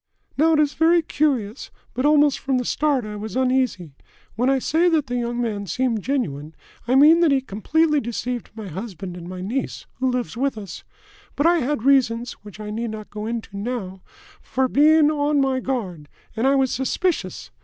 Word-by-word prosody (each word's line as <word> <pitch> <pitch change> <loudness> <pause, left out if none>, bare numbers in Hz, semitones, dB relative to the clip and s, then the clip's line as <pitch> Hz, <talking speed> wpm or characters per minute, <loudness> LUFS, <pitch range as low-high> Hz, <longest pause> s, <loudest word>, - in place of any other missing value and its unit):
"Now, 320 +3 +3
it 305 - +3
is 295 -1 +2
very 330 +1 +3
curious, 265 -8 -1 0.2
but 255 +4 +1
almost 295 -2 +4
from 270 -2 0
the 250 - -2
start 285 -4 0
I 210 0 -6
was 210 -1 -6
uneasy. 255 - 0 0.4
When 245 +3 +1
I 270 - +3
say 325 +6 +2
that 315 -4 +1
the 245 -1 -4
young 240 0 -2
man 210 -4 -2
seemed 235 +3 0
genuine, 165 - -3 0.3
I 250 - +2
mean 305 +5 +7
that 340 -2 +4
he 275 - +4
completely 295 +7 +1
deceived 240 +1 -4
my 220 -3 -7
husband 190 0 -7
and 175 0 -9
my 185 0 -6
niece, 235 +8 -3
who 260 0 +1
lives 250 -2 -2
with 270 0 -1
us. 200 -5 -8 0.5
But 285 - 0
I 340 0 +5
had 275 -3 -1
reasons, 245 -3 +2
which 210 0 -12
I 210 0 -6
need 230 +2 -3
not 215 -1 -8
go 210 +1 -5
into 225 -3 -5
now, 200 -3 -4 0.4
for 260 0 0
being 300 +3 +5
on 295 -1 +1
my 265 -1 +1
guard, 190 - -4 0.3
and 235 +4 +1
I 275 - +4
was 265 -2 +2
suspicious. 265 - -2
250 Hz, 195 wpm, -22 LUFS, 215-285 Hz, 0.5 s, mean